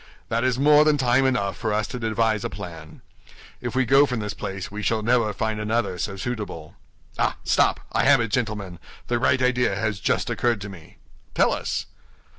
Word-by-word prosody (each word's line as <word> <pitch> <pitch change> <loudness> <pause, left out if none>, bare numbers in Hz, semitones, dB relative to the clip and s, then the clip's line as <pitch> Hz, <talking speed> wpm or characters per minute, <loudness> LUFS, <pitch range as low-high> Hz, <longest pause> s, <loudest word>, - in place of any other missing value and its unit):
That 115 +2 0
is 130 -1 +1
more 150 +2 +6
than 150 -1 +3
time 130 0 +3
enough 100 -8 0
for 110 -2 -2
us 105 +1 0
to 125 - -5
devise 110 -1 0
a - - -2
plan. 80 -6 -9 0.6
If 120 -1 -4
we 130 0 +2
go 135 +4 +5
from 125 -3 -2
this 105 -1 -4
place 95 -2 -6
we 105 +1 -5
shall 110 +1 0
never 115 -2 +2
find 110 +1 -2
another 105 -4 -1
so 95 +3 -3
suitable. 100 -8 -5 0.5
Ah, - - +1
stop! - - +2
I - - +1
have 140 -1 +6
it, 115 -1 -1
gentlemen; 105 -7 -2 0.3
the 120 0 +1
right 130 +1 +2
idea 125 -5 +2
has 105 -1 -2
just - - 0
occurred 120 -3 +1
to 100 - -6
me." 90 -5 -13 0.4
"Tell - - +3
us." - - -3
110 Hz, 200 wpm, -24 LUFS, 100-125 Hz, 0.6 s, more